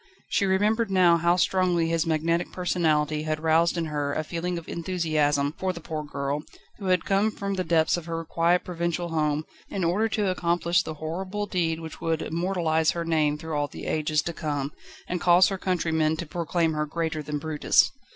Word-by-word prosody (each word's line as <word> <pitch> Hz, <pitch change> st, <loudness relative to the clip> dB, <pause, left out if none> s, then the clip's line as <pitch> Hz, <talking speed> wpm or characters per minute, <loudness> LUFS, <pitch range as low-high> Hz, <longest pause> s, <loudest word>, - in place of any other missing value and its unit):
She 200 Hz, -, +1 dB
remembered 210 Hz, +4 st, +2 dB
now 180 Hz, -3 st, +5 dB
how 170 Hz, +1 st, +3 dB
strongly 180 Hz, -2 st, +2 dB
his 165 Hz, -1 st, 0 dB
magnetic 165 Hz, +2 st, 0 dB
personality 155 Hz, -4 st, +1 dB
had 155 Hz, 0 st, -2 dB
roused 165 Hz, +2 st, +3 dB
in 170 Hz, -, 0 dB
her 145 Hz, -2 st, -2 dB
a 155 Hz, -, -1 dB
feeling 170 Hz, +3 st, -3 dB
of 170 Hz, -, -8 dB
enthusiasm 155 Hz, -5 st, 0 dB
for 185 Hz, -1 st, 0 dB
the 170 Hz, -, -8 dB
poor 155 Hz, -2 st, -5 dB
girl, 140 Hz, 0 st, -3 dB, 0.4 s
who 200 Hz, -, -7 dB
had 185 Hz, -2 st, +2 dB
come 200 Hz, +2 st, +2 dB
from 200 Hz, -2 st, -4 dB
the 185 Hz, -1 st, -1 dB
depths 160 Hz, -1 st, +2 dB
of 170 Hz, -, -6 dB
her 165 Hz, 0 st, -3 dB
quiet 170 Hz, +2 st, +2 dB
provincial 170 Hz, 0 st, -2 dB
home, 155 Hz, -1 st, 0 dB, 0.2 s
in 195 Hz, -, -3 dB
order 200 Hz, +7 st, +1 dB
to 210 Hz, -2 st, 0 dB
accomplish 175 Hz, +1 st, +1 dB
the 160 Hz, -3 st, -6 dB
horrible 185 Hz, +7 st, -4 dB
deed 165 Hz, -4 st, -1 dB
which 160 Hz, -1 st, -9 dB
would 160 Hz, -1 st, 0 dB
immortalise 165 Hz, -2 st, 0 dB
her 170 Hz, -1 st, -3 dB
name 155 Hz, -2 st, +1 dB
through 160 Hz, +1 st, -6 dB
all 145 Hz, 0 st, 0 dB
the -, -, -9 dB
ages 155 Hz, -1 st, 0 dB
to 170 Hz, -, -3 dB
come, 145 Hz, -3 st, -3 dB, 0.4 s
and 180 Hz, 0 st, -3 dB
cause 180 Hz, +2 st, +6 dB
her 195 Hz, -1 st, -4 dB
countrymen 160 Hz, -4 st, +1 dB
to 170 Hz, -, -4 dB
proclaim 165 Hz, 0 st, 0 dB
her 150 Hz, 0 st, -1 dB
"greater 160 Hz, 0 st, -2 dB
than 150 Hz, 0 st, -4 dB
Brutus." 150 Hz, 0 st, +2 dB
165 Hz, 195 wpm, -26 LUFS, 155-180 Hz, 0.4 s, cause